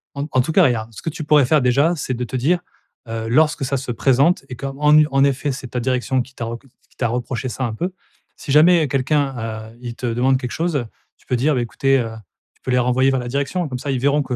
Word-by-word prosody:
En 140 +1 -3
en 130 - +3
tout 140 +6 -1
cas 185 +3 +5
regarde, 115 -4 0
ce - - -10
que 165 - -2
tu 155 0 -6
pourrais 150 -2 +5
faire 155 +1 +3
déjà, 140 +7 +3
c'est 130 -3 -3
de 125 +1 -3
te 130 - -5
dire, 165 +8 +1 0.5
heu, 115 0 -4
lorsque 150 +4 +2
ça 140 +1 -1
se 125 -2 -4
présente 135 +7 +2
et 125 - -7
qu'en, 135 +1 -6
en 150 +1 +6
en 135 0 +3
effet, 140 +1 0
c'est 130 -1 -7
ta 125 - -3
direction 130 +1 0
qui 130 +1 -18
t'a 115 - -5
re 115 +1 -5
qui 135 -1 -28
t'a 120 - 0
reproché 125 +1 -3
ça 130 +2 -4
un 115 -3 -2
peu. 180 +10 -3 0.4
Si 140 - -5
jamais 160 +1 +5
quelqu'un, 130 -5 -1
heu, 120 - -20
il 120 -2 -6
te 125 - -4
demande 125 +3 +2
quelque 125 - -5
chose, 160 -8 -1 0.3
tu - - -29
peux 125 - 0
dire: 145 +5 +2
«Ben, 125 - 0
écoutez, 135 +3 +1
heu» 115 -2 -3 0.4
tu - - -37
peux 130 - -4
les 125 - +3
renvoyer 125 +2 +2
vers 130 -1 0
la 120 - -5
direction 140 +6 -2
comme 125 - -4
ça 140 - -4
ils 130 - 0
verront 140 +2 +2
que, 130 -2 -4
130 Hz, 270 wpm, -20 LUFS, 125-145 Hz, 0.5 s, en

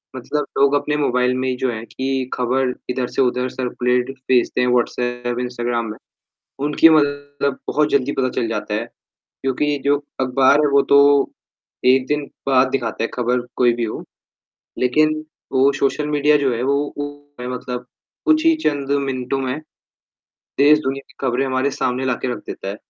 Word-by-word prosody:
मतलब 145 +4 -2
लोग 140 +1 +4
अपने 150 +1 0
मोबाइल 125 -3 +1
में 130 0 -1
ही, 125 - -1
जो 125 0 -1
है 110 -1 -6
कि 130 0 -3
खबर 125 +1 0 0.2
इधर 125 0 -1
से - - +2
उधर 125 0 +1
सर्कुलेट 125 0 -1 0.2
भेजते 125 -1 +2
हैं, 125 - +2
व्हॉट्सएप, 120 0 -1
इंस्टाग्राम 120 -1 -2
में। - - -9 0.7
उनकी 150 +2 +6
मतलब 145 -2 +1
बहुत 150 0 +2
जल्दी 140 0 +1
पता 130 -1 +2
चल 115 - -1
जाता 105 -2 -3
है। 110 +2 -1 0.4
क्योंकि 145 +2 -2
जो 145 0 +4 0.2
अखबार 130 +2 +4
है, 150 - +3
वो 140 0 +5
तो 140 0 +5 0.5
1 130 0 +5
दिन 150 0 -1 0.2
बाद 130 -1 +4
दिखाता 120 -4 -2
है, - - +1
खबर 125 0 0
कोई 120 -1 +3
भी 120 0 -2
हो। 110 - -4 0.8
लेकिन 155 +5 +2 0.3
वो 135 +1 +4
सोशल 135 +2 0
मीडिया 150 0 +3
जो 135 -3 +1
है, 115 - -3
वो 140 +2 0
ओ 145 -2 -8
है 125 - -4
मतलब 125 0 -5 0.4
कुछ 315 0 +3
ही 325 - +6
चंद 140 -2 0
मिनटों 130 0 -2
में, 130 +2 -2 1.0
देश-दुनिया 140 -1 +3
की - - -20
खबरें 130 +2 +1
हमारे 130 +1 0
सामने 130 0 -1
ला 125 - +1
के - - -1
रख 115 - -5
देता - - -6
है। 100 - -4
130 Hz, 175 wpm, -20 LUFS, 125-145 Hz, 1.0 s, उनकी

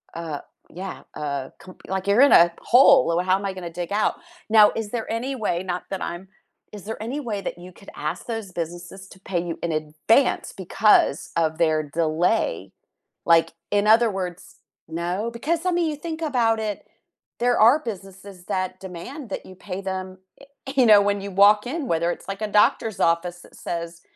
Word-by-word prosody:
uh, 160 -3 -5 0.3
yeah, 185 +3 -7
uh, 140 -3 -4
com 185 - -13
like 190 0 -3
you're 205 +6 +4
in 280 - +6
a 170 0 +7
hole, 260 -4 +6
"L 175 +2 0
how 185 +1 +3
am 200 - -6
I 195 - -2
gonna 180 -2 -7
dig 175 +1 -6
out?" 210 +1 +1 0.4
Now, 215 -1 +7
is 220 -2 -4
there 230 -2 -4
any 255 +4 -2
way, 185 -6 -2
not 180 -1 -4
that 195 - -4
I'm 175 +3 -6 0.5
is 205 - -9
there 220 +1 -6
any 260 +7 -4
way 220 -6 -3
that 190 - -5
you 180 +1 -11
could 200 - -15
ask 150 +1 -4
those 225 -5 -5
businesses 175 +2 -7
to 190 - -15
pay 180 -3 -2
you 170 -1 -5
in 170 - -1
advance 155 - +1
because 190 -4 +2
of 160 -1 +1
their 155 -2 +2
delay, 155 - -1 0.5
like, 165 -1 +4 0.2
in 205 +1 +2
other 225 0 +5
words 180 -2 -6 0.3
No? 175 +7 -3
'cause, 320 +9 -2
I 365 - +2
mean, 345 -2 +1
you 300 - -3
think 320 +2 -6
about 235 -7 +1
it, 210 -2 -4 0.5
there 245 0 +2
are 235 +7 +6
businesses 195 - -9
that 185 0 -2
demand 195 - -8
that - - -5
you 185 - -12
pay 185 0 -7
them, 185 -1 -5 0.2
eh - - -13 0.3
you 260 -3 +5
know, 210 -1 +8
when 200 0 0
you 200 - -6
walk 205 +3 +5
in, 290 0 -3
whether 170 +1 +1
it's - - -8
like 195 +1 -5
a 215 - -1
doctor's 210 0 +2
office 175 +1 0
that - - -17
says, 170 0 -6
195 Hz, 195 wpm, -23 LUFS, 175-225 Hz, 0.5 s, know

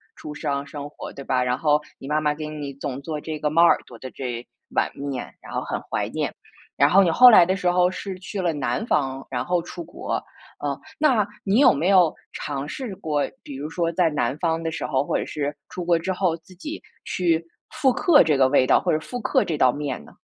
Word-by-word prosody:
出 150 - -8
生， 140 -2 -2
生 145 0 -7
活 - - -9
对 140 - -8
吧？ 125 -1 +1
然 125 0 0
后， 150 -1 +2 0.2
你 135 - -9
妈 155 +1 +1
妈 150 -1 +2
给 155 0 -6
你 145 -2 -6
总 140 -1 -5
做 150 +1 -4
这 155 0 -5
个 150 - 0
猫 165 +3 +4
耳 170 - +6
朵 120 -2 -13
的 130 - -7
这 120 -2 -5 0.2
碗 - - +1
面， 140 -3 -5
然 - - -11
后 - - 0
很 - - -4
怀 - - 0
念， - - -2 0.4
然 140 +2 +5
后 195 +1 +6
你 170 - +2
后 250 +7 +9
来 180 -6 +8
的 185 - +1
时 180 -2 +1
候 180 0 +3
是 185 0 -6
去 195 +1 -6
了 170 -3 +1
南 150 +9 -2
方， 135 -2 0
然 125 -1 -2
后 175 +3 0
出 175 0 -8
国。 170 - -4 0.4
呃， - - -3 0.2
那 250 -10 +3 0.2
你 205 +5 +2
有 285 - +7
没 155 +6 0
有 180 -5 +5 0.2
尝 145 -1 -4
试 230 - -5
过 155 -6 -1 0.2
比 140 -2 -8
如 150 +2 -5
说 165 0 -1
在 170 -1 +2
南 135 -4 -1
方 165 -1 0
的 165 - -2
时 - - -4
候， 135 -2 +1
或 - - -1
者 - - +1
是 145 0 -3
出 180 - -5
国 170 -1 +3
之 190 +3 -2
后 185 -3 +1
自 170 +3 -17
己 300 - -7 0.2
去 170 -2 0 0.2
复 265 -3 +2
刻 290 - +5
这 155 -2 +2
个 130 - +6
味 130 -2 +4
道 - - +5
或 - - 0
者 155 - +2
复 245 +9 -6
刻 - - +2
这 160 - -1
道 130 -3 +4
面 145 +1 -4
呢？ - - -18
155 Hz, 260 characters per minute, -24 LUFS, 140-180 Hz, 0.4 s, 后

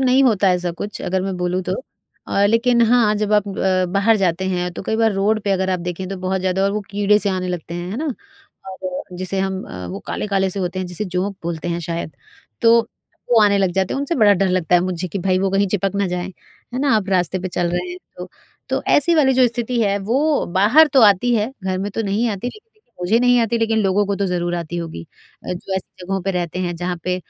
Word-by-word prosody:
नहीं 260 +1 +4
होता 205 -5 +3
है 180 - +4
ऐसा 175 -1 -3
कुछ 205 +4 -6
अगर 185 +1 -1
मैं 190 -1 -3
बोलूँ 180 +1 -1
तो - - -3 0.6
अ, 200 - +2
लेकिन 235 +2 +3
हाँ, 230 -2 +4
जब 210 0 -1
आप 210 -1 +3
अ, 190 -1 +1
बाहर 210 +3 +3
जाते 190 -1 0
हैं 180 -1 -1
तो - - -7
कई 220 - -1
बार 225 -2 +3
रोड 210 +3 +1
पे 200 - -1
अगर 190 0 0
आप 180 -1 -1
देखें 180 +1 -5
तो 195 - -4
बहुत 185 +1 -2
ज़्यादा 190 +1 0
और 200 - +2
वो 210 - -1
कीड़े 205 +1 +3
से 205 - -1
आने 185 -1 -2
लगते 170 -1 -5
हैं, 175 +1 -5
है 215 - -4
ना? 310 - -3 0.6
और 185 -1 -6
जिसे 185 +1 -3
हम 190 0 -2
अ, 90 0 -8
वो 95 +3 -6
काले-काले 195 -2 -1
से 195 +1 -3
होते 180 +1 -3
हैं 185 - -3
जिसे 180 +4 -4
जोंक 185 +2 -2
बोलते 170 0 -4
हैं 170 0 -2
शायद। 170 -1 -4 0.5
तो 230 0 +6 0.5
वो 225 -2 +6
आने 200 -1 +4
लग 190 -2 +2
जाते 190 0 0
हैं - - -2
उनसे 285 +4 -1
बड़ा 210 -7 +5
डर 195 0 +1
लगता 180 -1 +1
है 175 - +6
मुझे 180 0 -3
कि 195 - -4
भई 185 +1 +1
वो 195 0 0
कहीं 195 +1 +2
चिपक 195 0 -1
ना 200 -1 +1
जाए, 180 0 -3 0.5
है - - -1
ना? 280 -4 +3
आप 200 -2 -2
रास्ते 185 -1 +1
पे 185 - -3
चल 175 -1 -1
रहे 360 - -2
हैं 360 - -6 0.2
तो, - - -7 0.4
तो - - -1
ऐसी 335 +4 +4
वाली 275 -4 +4
जो 255 -1 +5
स्थिति 240 0 -2
है 200 -1 +1
वो 275 +9 +1
बाहर 220 - +6
तो 270 - +6
आती 215 +4 +5
है, 220 +3 0
घर 185 -1 -1
में 200 +2 -3
तो 225 - -2
नहीं 215 +3 0
आती, 205 +4 -3
लेकिन 430 - -14 0.3
मुझे 195 +6 +2
नहीं 245 0 +4
आती 230 +1 0
लेकिन 225 -1 +1
लोगों 200 0 +2
को 200 - 0
तो 200 - 0
ज़रूर 175 -1 -1
आती 170 0 -4
होगी। 165 - -6 0.4
अ, - - -3
जो 185 +2 -5
ऐसी 180 -1 -8
जगहों 195 +1 -2
पे 195 - -1
रहते 180 -1 -3
हैं 175 -1 -2
जहाँ 180 +1 -3
पे 180 0 0
195 Hz, 255 wpm, -20 LUFS, 180-215 Hz, 0.6 s, तो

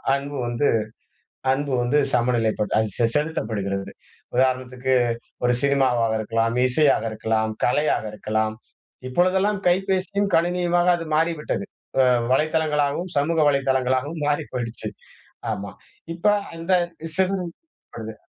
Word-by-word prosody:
அன்பு 140 +1 -5
வந்து 120 +4 +1 0.9
அன்பு 140 +1 -2
வந்து 125 +5 +2 0.2
சமநிலைப்பட்டு 120 -3 +1
அ - - +4 0.2
செ 115 - +4
செலுத்தப்படுகிறது. 105 -10 -2 0.5
உதாரணத்துக்கு 130 0 +1 0.5
ஒரு 125 - +3
சினிமாவாக 130 -5 +2
இருக்கலாம், 115 +2 0
இசையாக 140 -2 +3
இருக்கலாம், 110 0 -1
கலையாக 145 -2 +1
இருக்கலாம். 110 +1 -1 0.5
இப்பொழுதெல்லாம் 190 +6 +2
கைபேசியும் 190 +2 +1
கணினியுமாக 175 +1 +2
அது 165 - -6
மாறிவிட்டது. 165 +4 0 0.4
அ - - +5 0.3
வலைத்தளங்களாகவும் 155 +3 +1
சமூக 160 +3 +1
வலைத்தளங்களாகவும் 135 +2 0
மாறி 145 +1 0
போய்டுச்சு. 120 -2 -4 0.6
ஆமா. 100 -1 -4 0.4
இப்ப 170 - -13 0.3
அந்த 165 +3 -1 0.4
செதுறப்படுது. 180 - -4
140 Hz, 100 wpm, -23 LUFS, 120-165 Hz, 0.9 s, அ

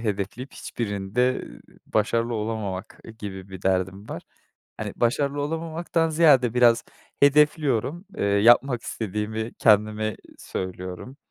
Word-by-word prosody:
hedefleyip, 105 +4 -3
hiçbirinde 110 +3 -2 0.4
başarılı 115 +2 0
olamamak 105 -4 -4 0.2
gibi 95 -2 -7
bir 95 -1 -10
derdim 95 +2 -1
var. - - -6 0.5
Hani, - - -5
başarılı 140 +4 +1
olamamaktan 165 +2 -1
ziyade, 140 -7 +4
biraz 120 -1 +5 0.4
hedefliyorum. 150 - +3
Eee, - - -1
yapmak 120 +5 +4
istediğimi 110 +1 -4
kendime 110 0 +3 0.2
söylüyorum, 95 +7 -6
115 Hz, 100 wpm, -25 LUFS, 100-135 Hz, 0.5 s, biraz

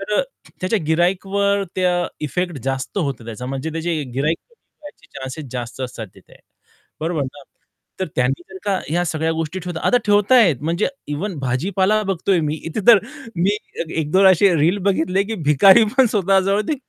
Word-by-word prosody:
तर 210 +1 -1
अ, - - +4 0.5
च्या 220 - +2
गिर्हाईकवर 195 +4 +1
त्या 180 -1 +1 0.2
इफेक्ट 175 +1 -2
जास्त 135 +8 -3
होतो 140 -8 -3
त्याचा 115 +2 -7
म्हणजे 135 +4 -4
त्याची 165 -1 -2
गिर्हाईकच 150 +5 0 0.2
कमी - - -56
व्हायचे 295 -1 -13
चान्सेस 135 +3 -6
जास्त 120 0 -6
असतात 125 -3 -5
तिथे. - - -19 0.7
बरोबर 160 -2 -1
ना? 135 +2 -7 0.6
तर 190 - 0
त्यांनी 135 +6 0
जर 190 - -9
का 195 -2 +1
ह्या 175 +3 0
सगळ्या 160 +1 -1
गोष्टी 165 +3 -3
ठेवतात 175 -2 -6
आता 250 - +4
ठेवत 205 +3 +3
आहेत 215 - +6
म्हणजे 170 +5 0 0.2
इव्हन 170 +7 -3
भाजीपाला 190 - +1
बघतोय 190 -1 +1
मी 150 0 -1
इथे 165 +6 -3
तर 225 -3 +10 0.4
मी 195 +5 +2 0.4
1-2 185 +6 +3
असे 190 0 +5
रील 170 +7 +2
बघितले 185 +1 +1
की 225 +2 -4
भिकारी 190 - +6
पण 265 -2 +6
स्वतः 195 -3 +2
जवळ 195 +2 +1
ते 310 - +1
175 Hz, 175 wpm, -20 LUFS, 150-195 Hz, 0.7 s, तर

